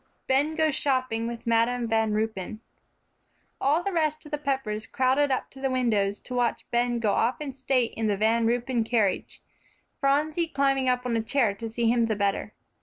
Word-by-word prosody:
VI - - -40 0.3
BEN 295 +4 +2
GOES 315 -2 +2
SHOPPING 255 -5 0
WITH 235 0 -6
MADAM 235 +1 +2
VAN 220 -1 +1
RUYPEN 215 -1 -3 1.0
All 300 +6 +2
the 395 - -1
rest 310 -3 0
of 300 - -12
the 295 - -2
Peppers 265 -7 -2
crowded 265 +3 +2
up 260 - -2
to 270 - -12
the 270 - 0
windows 215 -6 +1
to 250 - -9
watch 245 -1 0
Ben 240 0 +1
go 220 -3 +1
off 235 +5 +1
in 290 -3 -5
state 260 -2 0
in 225 -1 -1
the 205 -2 +1
Van 225 +2 +2
Ruypen 240 0 0
carriage, 220 -4 -1 0.6
Phronsie 300 +4 +1
climbing 275 -3 +1
up 250 0 0
on 240 -2 0
a 225 - +1
chair 225 -2 +1
to 225 +3 -6
see 230 +1 -1
him 235 0 +3
the 220 - 0
better. 200 -1 -1
245 Hz, 195 wpm, -26 LUFS, 225-275 Hz, 1.0 s, him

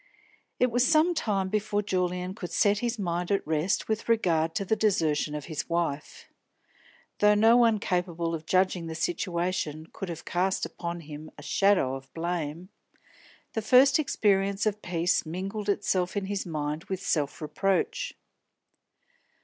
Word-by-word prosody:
It 250 -1 +3
was 245 +1 +3
some 315 +5 +4
time 200 - -1
before 210 0 0
Julian 180 -1 -1
could 180 -4 -7
set 205 0 +3
his 240 0 -2
mind 175 -3 -2
at 200 -1 +1
rest 160 +5 0
with 220 +1 -2
regard 165 -8 +2
to 200 - -1
the 220 - +2
desertion 160 -8 +1
of 150 - -5
his 155 -3 -5
wife. 165 -4 -2 0.9
Though 210 0 +5
no 225 +3 +6
one 230 -3 +5
capable 175 -3 -1
of 160 -1 -5
judging 185 -2 +1
the 160 - -5
situation 170 -2 -2
could 195 - -6
have 170 -1 -7
cast 185 +2 0
upon 170 0 -5
him 155 0 -9
a 145 - -11
shadow 180 -2 +2
of 135 0 -8
blame, 170 0 -3 0.8
the 220 - -1
first 255 +7 +5
experience 200 -8 +1
of 210 -1 -1
peace 175 0 +1
mingled 195 +5 -4
itself 185 -1 0
in 200 - -1
his 200 -1 -3
mind 150 0 -3
with 190 -1 -4
self 145 -3 -1
reproach. 180 +6 -1
185 Hz, 155 wpm, -28 LUFS, 165-205 Hz, 0.9 s, no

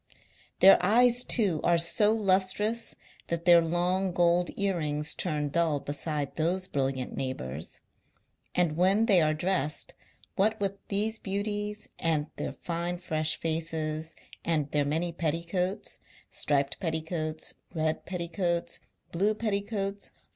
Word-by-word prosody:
Their 195 -1 +8
eyes, 240 +5 +4
too, 195 -10 +2
are 170 0 +4
so 190 +5 +4
lustrous 210 +2 +1 0.3
that 170 0 -2
their 175 -1 +8
long 175 +3 0
gold 175 0 +3
ear 200 -2 0
rings 150 0 0
turn 150 -4 -1
dull 160 -1 +1
beside 145 0 -3
those 180 +4 0
brilliant 135 -4 -2
neighbours; 80 - -5 0.7
and 170 -4 +2
when 190 +6 +3
they 195 -6 +5
are 155 0 +2
dressed, 155 -3 -1 0.4
what 215 +3 +2
with 200 -1 -2
these 215 +2 0
beauties, 205 +1 -3
and 160 -3 +1
their - - -4
fine 175 +1 -3
fresh 155 -3 -1
•'id 160 -1 -2 0.6
their 145 -1 +1
many 165 +4 -1
petticoats 170 +4 -1 0.2
— - - -24
striped 140 -1 0
pet 165 -4 -1
ticoats, 160 -1 -2 0.2
red 160 -2 -1
petticoats, 170 -1 -2 0.3
blue 200 +5 +1
petticoats, 200 -2 -2
ahva. - - -36
170 Hz, 130 wpm, -28 LUFS, 155-195 Hz, 0.7 s, Their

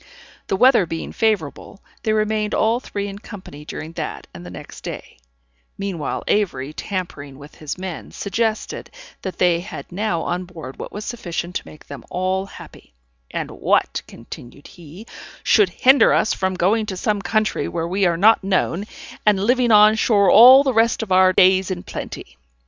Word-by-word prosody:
The - - 0
weather 240 -3 +4
being 165 0 -5
favorable, 205 -3 -2 0.2
they 220 - -1
remained 215 -1 0
all 225 +2 +2
three 205 -5 -5
in 200 0 -8
company 185 -9 -11
during 155 +1 -7
that - - -6
and - - -10
the 90 - -9
next 90 - -11
day; - - -8 0.6
meanwhile 195 -6 -4
Avery, 155 -9 -1
tampering 155 -8 -6
with 145 +1 -13
his 155 +1 -6
men, 185 -3 -7
suggested, 220 +2 -3 0.3
that 190 - -6
they 175 -2 +3
had 180 +1 -9
now 180 -3 -2
on 180 +1 -3
board 160 -7 -10
what - - -7
was 205 +1 -7
sufficient 175 -7 -5
to - - -11
make 155 - -14
them 140 -4 -10
all 185 +2 -1
happy; - - -14 0.3
"and - - -4
what," - - 0
continued 125 +3 -12
he, 175 +5 -13 0.4
"should 415 -3 +4
hinder 265 +2 +4
us - - +2
from 190 -1 -2
going 210 +5 +1
to 190 - -5
some 210 +1 -1
country 215 +3 0
where 165 -1 -3
we 190 +2 +1
are 170 -1 0
not 215 +4 +5
known, 190 0 0 0.4
and 210 -2 +3
living 245 +1 +2
on 210 0 +7
shore 205 -3 +3
all 255 +5 +9
the 265 -2 0
rest 225 0 +2
of 205 - -9
our 185 0 +5
days 185 +1 +4
in 180 -2 -4
plenty?" 65 - -8
190 Hz, 175 wpm, -21 LUFS, 170-215 Hz, 0.6 s, all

